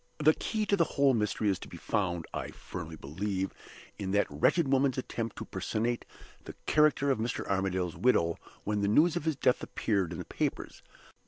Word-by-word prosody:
"The 155 Hz, +1 st, +5 dB
key 215 Hz, +5 st, -2 dB
to 205 Hz, -, +3 dB
the 175 Hz, -, +4 dB
whole 140 Hz, -1 st, +5 dB
mystery 105 Hz, -1 st, 0 dB
is 95 Hz, -, 0 dB
to -, -, -9 dB
be -, -, -9 dB
found, 85 Hz, -4 st, -1 dB
I -, -, -3 dB
firmly 80 Hz, -3 st, -7 dB
believe, 95 Hz, +7 st, -3 dB, 0.5 s
in 100 Hz, -2 st, -3 dB
that 105 Hz, 0 st, +4 dB
wretched 135 Hz, -, +3 dB
woman's 135 Hz, -1 st, +2 dB
attempt 115 Hz, -3 st, -3 dB
to -, -, -6 dB
personate 120 Hz, +2 st, -2 dB, 0.4 s
the -, -, -8 dB
character 150 Hz, -2 st, +4 dB
of 130 Hz, -, 0 dB
Mr. 115 Hz, +2 st, -2 dB
Armadale's 95 Hz, -3 st, 0 dB
widow 85 Hz, -9 st, +2 dB, 0.2 s
when 105 Hz, 0 st, 0 dB
the 100 Hz, -, +2 dB
news 155 Hz, +11 st, +4 dB
of 175 Hz, -, -2 dB
his 160 Hz, -2 st, +1 dB
death 125 Hz, -1 st, +2 dB
appeared 100 Hz, -6 st, -1 dB
in 85 Hz, -, -5 dB
the -, -, -5 dB
papers. -, -, -3 dB
110 Hz, 190 wpm, -30 LUFS, 95-140 Hz, 0.5 s, The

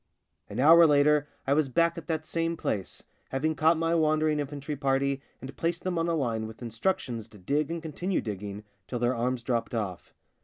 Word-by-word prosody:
An -, -, -5 dB
hour 165 Hz, +4 st, +8 dB
later 145 Hz, 0 st, +4 dB, 0.2 s
I 135 Hz, -, +3 dB
was 145 Hz, -2 st, +2 dB
back 170 Hz, +5 st, +2 dB
at 170 Hz, -3 st, -8 dB
that 160 Hz, -2 st, -2 dB
same 165 Hz, +1 st, -1 dB
place, 100 Hz, -10 st, -3 dB, 0.3 s
having 155 Hz, +4 st, 0 dB
caught 160 Hz, +2 st, +3 dB
my 165 Hz, +1 st, +1 dB
wandering 155 Hz, -1 st, +2 dB
in 145 Hz, -, -1 dB
fantry 145 Hz, +1 st, -5 dB
party 135 Hz, 0 st, 0 dB, 0.2 s
and 130 Hz, +1 st, -9 dB
placed 170 Hz, 0 st, -2 dB
them 180 Hz, -2 st, -1 dB
on 165 Hz, -, 0 dB
a 170 Hz, -, +1 dB
line 115 Hz, -7 st, -1 dB
with 110 Hz, +2 st, -10 dB
instructions 115 Hz, -, -2 dB
to 110 Hz, -, -15 dB
dig 140 Hz, -, -1 dB
and 165 Hz, -1 st, -4 dB
continue 175 Hz, +4 st, -2 dB
digging 105 Hz, 0 st, -5 dB, 0.2 s
till 125 Hz, -, -3 dB
their 120 Hz, +1 st, +1 dB
arms 120 Hz, +1 st, -1 dB
dropped 120 Hz, -1 st, -1 dB
off. 100 Hz, -6 st, -4 dB
145 Hz, 200 wpm, -28 LUFS, 120-165 Hz, 0.3 s, hour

